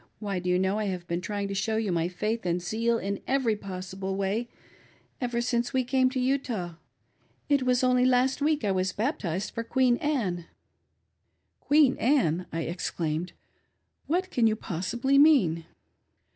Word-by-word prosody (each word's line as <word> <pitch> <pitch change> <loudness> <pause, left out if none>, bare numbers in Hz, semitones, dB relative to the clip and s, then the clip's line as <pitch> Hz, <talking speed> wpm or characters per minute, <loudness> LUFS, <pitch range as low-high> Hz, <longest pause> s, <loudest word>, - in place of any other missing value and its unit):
Why, 200 -3 -3
do 180 0 -3
you, 180 - +3
know, 190 +3 +1
I 215 - -1
have 180 -3 -3
been 170 0 -2
trjdng 205 +1 -3
to - - -3
show 220 +3 -1
|ny 175 -6 0
ffiith 215 +5 -2
j^iid 175 0 -1
zeal 230 +5 0
in 200 -2 -3
every 260 -5 +2
possible 190 -1 -5
way 200 +5 -1 0.7
ever 240 -1 -1
since 240 +1 -1
we 260 -1 +2
came 255 +1 +2
to 260 0 -3
Utah. 250 -9 -1 0.8
It 285 -2 +3
was 250 0 +2
only 250 0 +4
last 255 +1 +3
wee^ 300 +1 +1
I 200 - +2
was 185 0 0
baptized 205 - -2
for 230 - -3
Queen 245 +1 +2
Anne." 205 - -1 1.1
"Queen 290 -2 +4
Anne!" 185 - +2
I 165 - -2
exclaiiped. 170 0 -3 0.7
"What 365 +4 0
can 235 -2 +3
you 215 - +2
possibly 235 +9 0
mean 195 - +4
220 Hz, 160 wpm, -27 LUFS, 185-255 Hz, 1.1 s, only